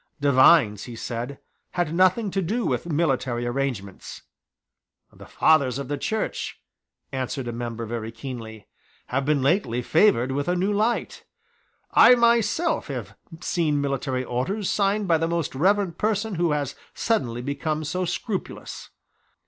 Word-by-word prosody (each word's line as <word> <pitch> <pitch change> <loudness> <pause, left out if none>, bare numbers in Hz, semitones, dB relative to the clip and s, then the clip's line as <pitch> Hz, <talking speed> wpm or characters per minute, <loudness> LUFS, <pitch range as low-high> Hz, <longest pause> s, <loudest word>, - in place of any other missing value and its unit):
Divines, 130 - +5
he 120 - -8
said, 120 +4 -5 0.4
had 175 -3 -1
nothing 185 +4 +3
to 195 - 0
do 215 +7 -1
with - - -1
military 135 -6 0
arrangements. 120 -6 -4 0.9
"The - - -13
Fathers 140 -6 +3
of 140 -1 -5
the 145 - -1
Church," 220 +9 -3 0.5
answered 130 -1 -3
a - - -2
member 115 -1 -5
very 115 0 -4
keenly, 115 -3 -8 0.4
"have 135 +2 -1
been 145 -2 +1
lately 135 - +1
favoured 155 - +3
with 140 +2 -2
a 180 - +1
new 190 +3 0
light. 220 +4 -1 0.7
I - - +7
have 250 - +8
myself 235 - +2 0.5
seen 160 -5 0
military 135 -2 -1
orders 180 - -2
signed 200 0 +1
by 165 -2 +3
the 165 - 0
Most 170 -2 -2
Reverend 190 +4 +1
person 215 0 0
who 170 -1 +1
has 145 -2 -2 0.2
suddenly 125 - -1
become 150 +3 -2
so 185 +5 -2
scrupulous. 190 +3 -5
145 Hz, 140 wpm, -24 LUFS, 125-190 Hz, 0.9 s, have